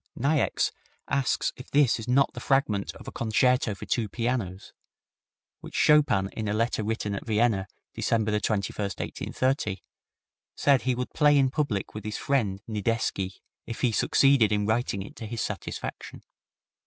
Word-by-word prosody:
Niecks 140 +3 +1 0.4
asks 140 -2 0
if 130 - -11
this 140 -5 +3
is 110 - -7
not 135 +2 +3
the - - -7
fragment 135 -8 +1
of - - -13
a - - -5
concerto 120 0 +1
for - - -9
two 115 -4 -1
pianos, 115 -5 -3 0.9
which - - -10
Chopin, 145 -11 +4
in 110 0 -5
a 105 - 0
letter 115 0 0
written 105 -1 -2
at 100 - -4
Vienna, 110 -3 +1 0.3
December 110 -2 0
21, 105 0 -1
1830, 105 +2 -2 0.7
said 140 -3 +3
he 130 0 0
would 125 +1 -4
play 150 -2 +5
in 135 -2 +3
public 135 -10 -2
with 105 - -7
his 105 -1 -4
friend 105 -9 0
Nidecki, 105 -3 -2 0.3
if 115 - -6
he 125 - +3
succeeded 130 -1 +4
in 105 -1 +1
writing 110 -3 0
it 100 - -12
to 110 - -6
his 115 +1 -4
satisfaction. - - -5
115 Hz, 155 wpm, -27 LUFS, 105-130 Hz, 0.9 s, play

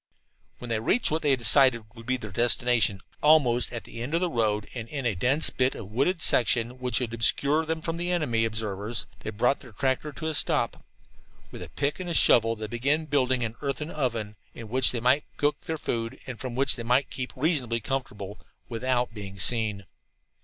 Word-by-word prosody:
When 120 - -9
they 110 - +1
reached 215 - +1
what 160 +1 0
they 145 -3 +3
decided 125 0 +5
should 115 -1 -12
be 130 0 +1
their 110 -4 -8
destination, 120 -2 +2 0.2
almost 140 -6 +4
at 120 -2 -6
the 115 - -9
end 140 +7 -3
of - - +2
the 180 -1 -1
road 105 -4 0
and 115 -3 -6
in 140 -4 -5
a 115 - +1
dense 130 - +2
bit 130 0 0
of 105 -2 -9
wooded 160 - 0
section 120 +1 +2
which 125 -1 +1
would 120 -3 -4
obscure 140 +7 +2
them 160 0 -2
from 165 +1 -3
enemy 160 -10 0
observers, 110 0 -2
they - - -6
brought 120 +6 +1
their 125 -5 -14
tractor 135 +4 -1
to 155 +3 -6
a 160 - -1
stop. - - 0 0.7
With - - -10
pick 145 +4 -1
and 175 -3 -1
shovel 115 -1 +4
they 110 0 -6
began 140 +8 0
building 130 -4 +1
an 115 -1 -3
earthen 145 +2 -3
oven, 115 -7 -3 0.2
in 115 -2 -9
which 130 +1 +3
they 120 - -3
might 130 +4 +3
cook 145 0 0
their 160 - -3
food, 115 -5 -3
and 125 -3 -7
from 125 -2 -5
which 135 +1 +1
they - - -5
might 125 +4 +1
keep 125 -1 -4
reasonably 130 -5 0
comfortable, 110 -5 -5 0.3
without 125 0 -1
being 100 -2 -8
seen. 105 +1 0
125 Hz, 195 wpm, -26 LUFS, 115-140 Hz, 0.7 s, decided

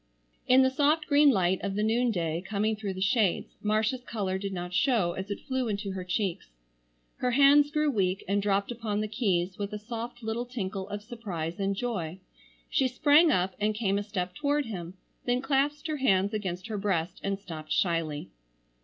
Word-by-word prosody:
In 260 +1 +6
the 260 - +3
soft 300 +3 +2
green 290 0 +5
light 185 -6 +2
of 195 -1 -3
the 210 - 0
noonday 215 -8 +1
coming 215 +3 -1
through 205 -3 -4
the 185 - -6
shades 200 -2 +1
Marcia's 215 +4 0
color 195 -6 -2
did 200 0 -4
not 180 -1 -5
show 225 -5 +2
as 190 +3 -6
it 205 - -4
flew 260 -2 -2
into 205 -1 -2
her 190 -1 -4
cheeks. 180 0 -2 0.7
Her 250 - 0
hands 285 +3 +6
grew 300 0 +1
weak 190 -5 0
and 200 +1 +1
dropped 200 +1 +1
upon 220 -3 -2
the 215 - -1
keys 195 -5 0
with 205 0 -3
a - - -2
soft 235 +2 -6
little 225 +2 -2
tinkle 195 -5 -4
of 205 0 -5
surprise 190 -8 -5
and 195 0 0
joy. 195 -7 -3 0.5
She 265 - +2
sprang 295 +6 +5
up 185 -7 +1
and 210 +1 +1
came 200 -2 +1
a - - -3
step 185 -3 -3
toward 290 -1 0
him, 180 -5 -6 0.3
then 245 0 +2
clasped 280 +3 0
her 310 -1 -2
hands 200 -6 +2
against 185 -3 -3
her 220 -2 -4
breast 180 -4 -1
and 195 0 -1
stopped 160 -6 -9
shyly. 165 -4 0
210 Hz, 190 wpm, -28 LUFS, 190-245 Hz, 0.7 s, In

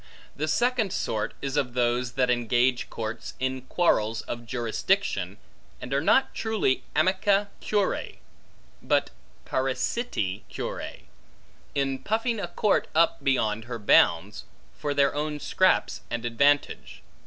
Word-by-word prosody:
The 155 - -2
second 235 +3 +1
sort 110 -10 -2
is 135 0 -2
of 130 -4 0
those, 120 0 +1
that 125 -1 +2
engage 120 +1 +1
courts 110 0 -5
in 130 0 -1
quarrels 115 -7 +1
of 120 0 -6
jurisdiction, 120 - -1 0.4
and 125 - -6
are 140 - +2
not 265 - +3
truly 220 - 0
amici 195 +5 +3
curiae, 205 -2 -1 0.6
but - - +1 0.3
parasiti 130 - -1
curiae, - - -6 0.7
in 135 -1 0
puffing 225 - -1
a 190 - -3
court 205 +3 +1
up 165 +1 +3
beyond 115 -5 +1
her 120 -1 -5
bounds, 100 -2 +3 0.3
for 145 -1 -3
their 140 -1 +3
own 150 0 -2
scraps 185 +5 +2
and 120 0 -3
advantage. 140 +5 +1
135 Hz, 125 wpm, -26 LUFS, 120-180 Hz, 0.7 s, not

